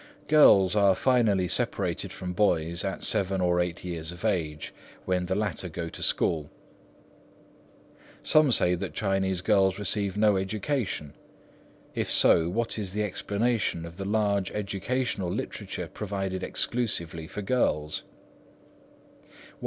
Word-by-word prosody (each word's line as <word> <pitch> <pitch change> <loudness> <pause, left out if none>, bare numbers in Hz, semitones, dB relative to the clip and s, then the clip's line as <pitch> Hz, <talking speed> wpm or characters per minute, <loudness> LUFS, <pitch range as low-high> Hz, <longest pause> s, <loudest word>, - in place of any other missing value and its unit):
Girls 100 -11 +6
are 100 -2 +4
finally 110 -8 +2
separated - - -1
from 90 -1 -6
boys 85 -4 +1
at 95 -1 -4
seven 95 0 +1
or 90 -1 +1
eight 90 -1 -2
years 85 -2 -5
of 90 +4 -8
age, 80 -8 -2 0.3
when 90 -1 -1
the 95 - -1
latter 100 -3 -2
go 85 +1 -5
to - - -10
school. 75 -3 0 1.7
Some 155 -3 +4
say 90 -6 +7
that 90 -3 -4
Chinese 95 -3 0
girls 95 -2 +2
receive 105 -1 -1
no 105 -2 +3
education. 95 - -3 0.8
If - - -2
so, 85 0 +4
what 115 +3 -2
is 95 -3 -4
the 105 +1 -1
explanation 105 -2 -1
of 85 +1 -11
the 95 - -5
large 100 -2 0
educational 105 0 -2
literature - - -5
provided 95 -3 -4
expressly 85 -8 -2
for 105 - -6
girls? 85 -10 0
95 Hz, 130 wpm, -27 LUFS, 90-105 Hz, 1.7 s, say